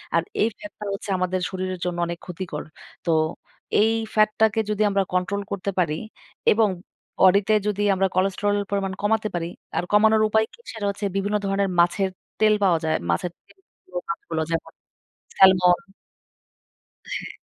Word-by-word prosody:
আর - - +3 0.2
এই 215 - +4
ফ্যাটটা 310 -8 -10
হচ্ছে 200 - -6
আমাদের 185 0 0
শরীরের 185 -1 -4
জন্য 175 -1 -2
অনেক 170 0 -5
ক্ষতিকর। 180 -4 -5 0.4
তো 170 - +2 0.7
এই 220 +1 +4 0.2
ফ্যাটটাকে 215 +1 +3
যদি 210 0 -1
আমরা 195 -1 +2
কন্ট্রোল 185 +2 0
করতে 200 0 -2
পারি 160 -4 +1 0.6
এবং 220 -1 +4 0.6
বডি 190 +2 +7
তে 215 - +4
যদি 205 -1 -1
আমরা 190 +1 +2
কোলেস্টেরল 195 +2 +1
পরিমাণ 195 -1 -1
কমাতে 215 +1 +1
পারি। 165 -1 -2 0.3
আর - - +1
কমানোর 215 +1 +5
উপায় 220 +1 +3
কি? - - -17
সেটা 220 -3 -5
হচ্ছে 200 +1 -3
বিভিন্ন 205 +2 0
ধরনের 195 0 +1
মাছের 190 +3 +3 0.3
তেল 215 -1 +5
পাওয়া 175 -4 +4
যায়। 155 - +1
মাছের 85 - 0
তেলযুক্ত 185 - -13
মাছগুলো। 165 -1 -3
যেমন 165 0 -2 0.7
স্যালমন 185 0 +5 1.2
হ্যাঁ। - - -4
195 Hz, 150 wpm, -24 LUFS, 180-210 Hz, 1.2 s, বডি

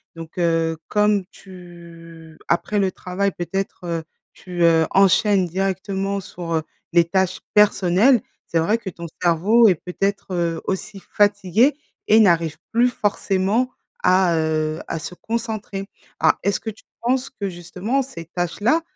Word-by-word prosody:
Donc, 165 +2 -10
heu, 165 -1 +1
comme 210 -1 +2
tu 170 -3 -13
après 205 +4 +1
le 190 -2 +1
travail 190 +2 -2
peut-être, 195 +2 -4
heu, 165 -1 -2 0.3
tu, 180 -2 -4
heu, 165 -1 +5
enchaînes 195 0 +4
directement 195 +2 -2
sur, 175 -2 -6
heu, 160 - 0 0.3
les 170 0 +5
tâches 190 +1 0
personnelles, 210 +3 +4 0.3
c'est 165 - +1
vrai 205 +8 +2
que 205 - -6
ton 170 -1 -9 0.2
cerveau 190 +7 +4
est 190 - +4
peut-être, 195 +3 -3
heu, 170 -2 -1
aussi 195 +1 -4
fatigué 205 - +3 0.3
et 220 - +6
n'arrive 170 -6 +3
plus 240 +2 +4
forcément 205 +1 0 0.3
à, 185 -2 +4
heu, 155 0 0
à - - -3
se 160 +3 -7
concentrer. 220 -2 -4 0.3
Ah, - - +3
est-ce 200 - 0
que 225 - -5
tu 220 - -19 0.2
penses 255 +2 0
que 205 -7 -5
justement 180 +9 -2
ces 250 -11 -8
tâches-là, 185 - 0
190 Hz, 145 wpm, -21 LUFS, 170-210 Hz, 0.3 s, et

